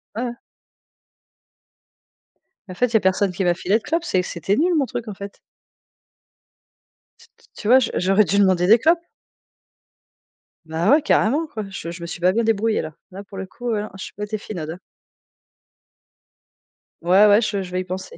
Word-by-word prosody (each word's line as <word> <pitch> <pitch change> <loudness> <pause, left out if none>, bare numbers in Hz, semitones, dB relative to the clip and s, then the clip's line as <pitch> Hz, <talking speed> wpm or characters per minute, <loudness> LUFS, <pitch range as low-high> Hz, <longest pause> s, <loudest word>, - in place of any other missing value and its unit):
Ouais. 240 +1 -3 2.4
En - - -6
fait, 250 - +2
il 240 - -11
y - - +6
a - - +2
personne 190 0 +1
qui 190 - -2
m'a 175 -1 +3
filé 190 +5 +1
de 225 - -11
clope, 330 +3 -1
c'est 185 - +1
que 180 - -7
c'était 190 +3 -1
nul 345 +7 +2
mon 290 -3 +2
truc 240 -2 -6
en - - -5
fait. 200 +1 -10 1.8
T - - -18
t - - -25
tu 210 - -6
vois, 250 - +7
je 245 - -1
j'aurais 195 +3 +3
dû 195 +4 0
demander 185 -3 +3
des 225 +4 +7
clopes. 330 +7 +4 1.7
Bah 160 +4 -1
ouais, 305 - +6
carrément 290 +1 +2
quoi, 225 -8 -6
je 180 -3 -6
je 175 0 -10
me 170 - -5
suis 175 - -7
pas 180 +1 +4
bien 230 +4 0
débrouillée 225 0 +1
là. 155 0 -7 0.2
Là 190 +2 -8
pour 195 0 -11
le 190 - -4
coup 240 +5 -6
ouais, 210 -2 0
non, 210 - -6
j'ai 190 - -8
pas 205 - -6
été 210 +1 -3
finaude 180 -7 -7
hein. 170 +3 -7 2.2
Ouais, 185 +5 +5
ouais, 205 +2 +5
je 210 -3 -1
je 180 - -10
vais 185 0 -1
y - - -5
penser. 185 +1 -7
200 Hz, 200 wpm, -21 LUFS, 185-225 Hz, 2.4 s, vois